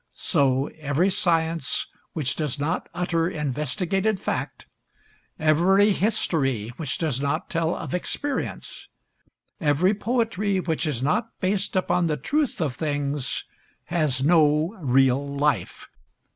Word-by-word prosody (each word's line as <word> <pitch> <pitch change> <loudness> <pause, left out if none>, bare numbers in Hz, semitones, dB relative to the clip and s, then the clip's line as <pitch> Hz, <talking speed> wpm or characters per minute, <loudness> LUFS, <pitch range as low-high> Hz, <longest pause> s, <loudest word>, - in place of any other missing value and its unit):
So 135 -5 +2
every 155 +6 +1
science 165 -5 +1 0.3
which 145 -5 0
does 150 -3 -1
not 155 +5 -2
utter 170 -1 0
investigated 170 - -1
fact, - - -4 0.7
every 180 +7 +4
history 140 - +1
which 150 -5 -2
does 150 -6 -1
not 145 +3 -2
tell 165 0 0
of - - -6
experience, 270 +9 -4 0.7
every 165 +4 +3
poetry 215 -3 0
which 165 -2 -1
is 130 -4 -2
not 215 - +1
based 195 +1 -1
upon 180 -2 +2
the 150 -2 0
truth 290 - -1
of 145 -6 -1
things, 145 -2 -2 0.5
has 145 -6 +1
no 155 +3 +3
real 135 0 +2
life. 140 -10 -1
160 Hz, 115 wpm, -24 LUFS, 140-185 Hz, 0.7 s, every